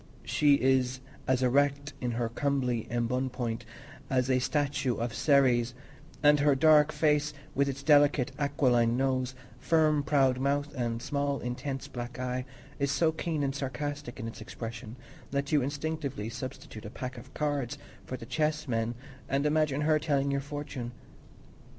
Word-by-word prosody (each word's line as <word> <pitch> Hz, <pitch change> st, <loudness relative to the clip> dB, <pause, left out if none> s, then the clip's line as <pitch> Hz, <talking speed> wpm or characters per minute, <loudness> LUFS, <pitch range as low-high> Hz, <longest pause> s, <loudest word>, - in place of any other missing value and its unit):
She 145 Hz, -2 st, +4 dB
is 130 Hz, -1 st, +2 dB, 0.3 s
as 130 Hz, 0 st, +2 dB
erect 140 Hz, +2 st, +2 dB
in 125 Hz, -2 st, -1 dB
her 120 Hz, 0 st, 0 dB
comely 125 Hz, -2 st, -1 dB
embonpoint 120 Hz, 0 st, -1 dB, 0.4 s
as 130 Hz, 0 st, +2 dB
a 130 Hz, -, +4 dB
statue 140 Hz, -1 st, 0 dB
of 115 Hz, -1 st, -3 dB
Ceres; 125 Hz, -5 st, +3 dB, 0.5 s
and 150 Hz, 0 st, +6 dB
her 145 Hz, -1 st, +4 dB
dark 155 Hz, +1 st, +6 dB
face, 150 Hz, -1 st, +1 dB, 0.2 s
with 140 Hz, 0 st, +2 dB
its 135 Hz, 0 st, -5 dB
delicate 145 Hz, -3 st, +4 dB
aquiline 125 Hz, -5 st, +2 dB
nose, 130 Hz, -1 st, 0 dB, 0.2 s
firm 155 Hz, -1 st, +3 dB
proud 135 Hz, -3 st, +2 dB
mouth, 145 Hz, +2 st, 0 dB
and 120 Hz, -3 st, -2 dB
small, 140 Hz, -1 st, -1 dB
intense, 135 Hz, +2 st, -4 dB
black 120 Hz, 0 st, -6 dB
eye, 125 Hz, 0 st, -2 dB, 0.3 s
is 140 Hz, 0 st, +1 dB
so 160 Hz, +2 st, +3 dB
keen 160 Hz, -2 st, -2 dB
and 135 Hz, -1 st, 0 dB
sarcastic 145 Hz, -1 st, -4 dB
in 115 Hz, -, -4 dB
its 115 Hz, -, -8 dB
expression 115 Hz, 0 st, -7 dB, 0.3 s
that 140 Hz, +1 st, -2 dB
you 150 Hz, -2 st, +4 dB
instinctively 140 Hz, -5 st, -3 dB
substitute 120 Hz, -3 st, -7 dB
a -, -, -5 dB
pack 125 Hz, +3 st, -6 dB
of 130 Hz, +2 st, -14 dB
cards 145 Hz, -3 st, -1 dB, 0.3 s
for 130 Hz, -, -5 dB
the 115 Hz, -, -9 dB
chess 155 Hz, +3 st, -1 dB
men 115 Hz, -1 st, -1 dB, 0.3 s
and 140 Hz, +2 st, +1 dB
imagine 150 Hz, -2 st, +2 dB
her 155 Hz, 0 st, +3 dB
telling 140 Hz, -3 st, +1 dB
your 140 Hz, 0 st, 0 dB
fortune. 140 Hz, -4 st, -6 dB
135 Hz, 155 wpm, -30 LUFS, 125-145 Hz, 0.5 s, and